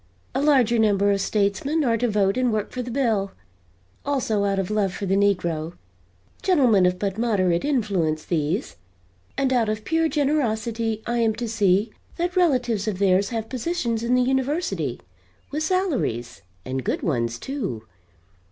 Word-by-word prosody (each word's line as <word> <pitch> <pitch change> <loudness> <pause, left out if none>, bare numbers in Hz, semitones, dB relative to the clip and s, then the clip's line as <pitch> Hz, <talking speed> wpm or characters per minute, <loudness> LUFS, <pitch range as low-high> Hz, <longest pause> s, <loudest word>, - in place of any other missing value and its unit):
A 265 - 0
larger 255 -6 +3
number 205 -2 +3
of 200 -1 +1
statesmen 215 +11 0
are 235 -4 +2
to 245 +2 0
vote 200 -1 +2
and 255 -1 +1
work 215 -1 -2
for 255 - -4
the 245 - -6
bill 225 -6 0 0.7
also 240 -8 0
out 195 -1 0
of 195 +1 -2
love 205 -3 +1
for 200 - -4
the 190 - 0
negro 175 -5 0 0.7
gentlemen 245 - +4
of 180 0 0
but 200 +2 -3
moderate 185 -7 +1
influence, 195 - 0
these 155 - -2 0.6
and 265 -1 +1
out 235 -4 +2
of 215 0 -3
pure 325 0 +1
generosity 230 -7 -1
I 240 0 -1
am 225 -2 +2
to 235 +1 -4
see 210 -1 +2 0.3
that 350 +1 -1
relatives 250 - +1
of 205 -4 -1
theirs 195 0 +2
have 225 -2 -3
positions 250 -3 -2
in 240 +2 +1
the 250 - +3
University, 255 - -1 0.5
with 300 +2 -2
salaries, 310 - -1 0.2
and 130 0 -3
good - - -2
ones, 120 -6 -1
too. 200 - -4
220 Hz, 160 wpm, -23 LUFS, 195-255 Hz, 0.7 s, gentlemen